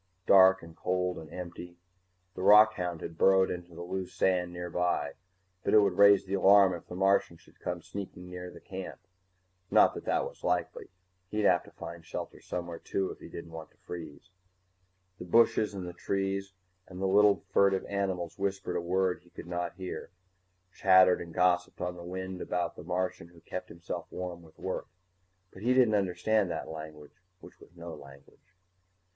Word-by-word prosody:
Dark 95 -1 +6
and 85 -1 -12
cold 90 0 -1
and 80 -2 -11
empty. 90 0 -8 0.6
The 90 - -7
rockhound 100 -4 +5
had 85 -1 -8
burrowed 95 0 +5
into 90 -1 -7
the 85 - -7
loose 95 +1 -4
sand 90 -2 +1
nearby, 90 0 -1 0.5
but - - +2
it - - +9
would 100 -2 0
raise 100 -1 +7
the 95 - -5
alarm 100 -1 +6
if 85 - -8
the 90 - -8
Martian 95 -2 +2
should - - -23
come 90 -1 -4
sneaking 95 -2 -8
near 90 0 -7
the 85 - -12
camp. 95 +1 -8 0.7
Not - - +5
that - - -8
that - - +1
was - - -10
likely - - -1 0.4
he'd 105 +2 -2
have 90 -3 +5
to - - -15
find 85 0 -9
shelter - - -7
somewhere 85 -1 -5
too, 95 -1 -2
if - - -11
he - - -11
didn't 85 -1 -9
want 80 -1 -8
to - - -34
freeze. 85 0 -9 0.9
_The 90 - -9
bushes 110 -1 +4
and 95 -2 -5
the 90 - -7
trees 95 +1 -2 0.3
and 90 -1 -10
the 95 - -1
little 100 +1 +4
furtive 100 -1 +3
animals 95 -3 -3
whispered 95 -2 -2
a - - -1
word 90 +1 0
he 90 - -23
could - - -10
not 85 0 -3
hear, 95 -1 -6 0.6
chattered 95 -1 +5
and 85 -1 -8
gossiped 90 +1 +1
on 90 0 -3
the 85 - -9
wind 95 +1 -6
about 90 -1 -2
the - - -10
Martian 90 -1 -2
who 85 -1 -19
kept - - -6
himself 85 0 -6
warm 90 -2 -6
with 80 -2 -19
work. - - -4 0.7
But 95 - -12
he 125 +3 +2
didn't 125 -4 +5
understand 100 +1 +1
that 85 - -4
language 80 -1 -10 0.2
which - - -15
was 85 - -18
no 85 -1 -8
language. 70 +5 -15
90 Hz, 185 wpm, -30 LUFS, 85-95 Hz, 0.9 s, it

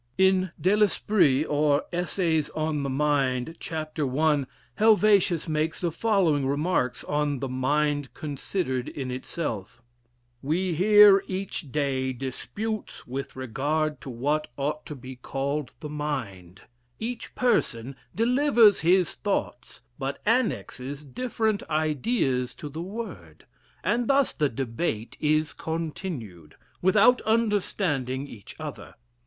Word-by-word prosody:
In 190 0 +4
"De 190 +3 +3
L'Esprit, 200 -8 +3
or, 145 -1 +2
Essays 170 -3 0
on 155 -1 -1
the 140 - -2
Mind," 135 0 0
chap. 155 -1 -5
I.. 145 +1 +2 0.3
Helvetius 205 -6 +4
makes 155 +1 -1
the 175 -2 0
following 170 -9 +2
remarks 145 -2 0
on 145 -1 0
the 135 +1 -3
"Mind 145 +1 0
considered 140 -2 -3
in 130 -3 -5
itself": 125 - -4 0.6
"We 175 +6 0
hear 205 +3 +7
every 190 +1 -2
day 135 -6 -2
disputes 135 - -5
with 135 +2 -5
regard 145 +5 -1
to - - -8
what 145 +6 -1
ought 150 +2 -2
to 150 - -6
be 130 0 -10
called 135 +1 -3
the 150 - -5
Mind; 120 -12 -5 0.4
each 230 +1 -5
person 135 - +1 0.2
delivers 235 -2 +5
his 180 +2 +3
thoughts, 200 -11 -3 0.2
but 135 0 -3
annexes 150 - -1
different 220 - -1
ideas 150 - 0
to 150 - -7
the 155 +3 -6
word; 175 - -7 0.4
and 235 +5 +1
thus 275 -1 +3
the 150 -3 +1
debate 115 -1 -3
is 155 +1 +1
continued, 150 - -5 0.3
without 210 +7 +5
understanding 190 - 0
each 110 -8 -11
other. - - -7
150 Hz, 120 wpm, -26 LUFS, 135-190 Hz, 0.6 s, hear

